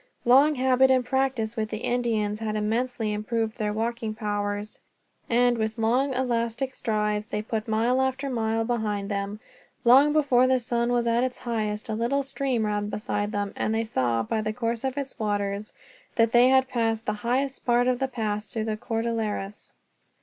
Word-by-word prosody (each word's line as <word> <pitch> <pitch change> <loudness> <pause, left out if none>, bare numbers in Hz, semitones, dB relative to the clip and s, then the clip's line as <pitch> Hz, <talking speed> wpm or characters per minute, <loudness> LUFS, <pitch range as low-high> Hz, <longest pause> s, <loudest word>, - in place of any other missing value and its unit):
Long 275 +5 +6
habit 260 0 +4
and 255 -1 +3
practice 260 -4 0
with 215 -2 -2
the 215 - -3
Indians 220 -4 0
had 215 -1 -3
immensely 220 +1 -1
improved 220 +1 -2
their 210 -1 0
walking 225 0 -2
powers 205 -1 -3 0.5
and, 240 0 +3
with 220 +1 -2
long 245 +5 +2
elastic 245 0 -1
strides, 210 -2 -1
they 210 -3 -3
put 220 0 -3
mile 230 +4 +2
after 265 +1 -1
mile 225 -3 0
behind 210 -4 -2
them. 200 +1 -3 0.5
Long 270 +5 +7
before 275 -5 +4
the 260 0 +3
sun 235 0 0
was 240 -1 +1
at 235 +1 +2
its 255 -1 -2
highest 215 -3 -3
a 220 - -2
little 240 +6 0
stream 270 -4 -1
ran 205 0 -1
beside 205 0 -2
them, 205 -1 -2
and 220 - -1
they 225 - +1
saw, 120 - 0
by 220 - -1
the 215 0 -2
course 230 0 -2
of 265 +1 -2
its 275 -3 -5
waters, 205 -1 -2 0.4
that 230 -1 +3
they 245 +1 +6
had 265 0 +4
passed 225 -2 -1
the 210 - 0
highest 265 +4 -1
part 240 0 +3
of 250 -1 +1
the 265 - 0
pass 215 -4 -3
through 220 -1 -2
the 215 -1 -2
Cordilleras. 225 -3 -3
230 Hz, 180 wpm, -26 LUFS, 215-250 Hz, 0.5 s, Long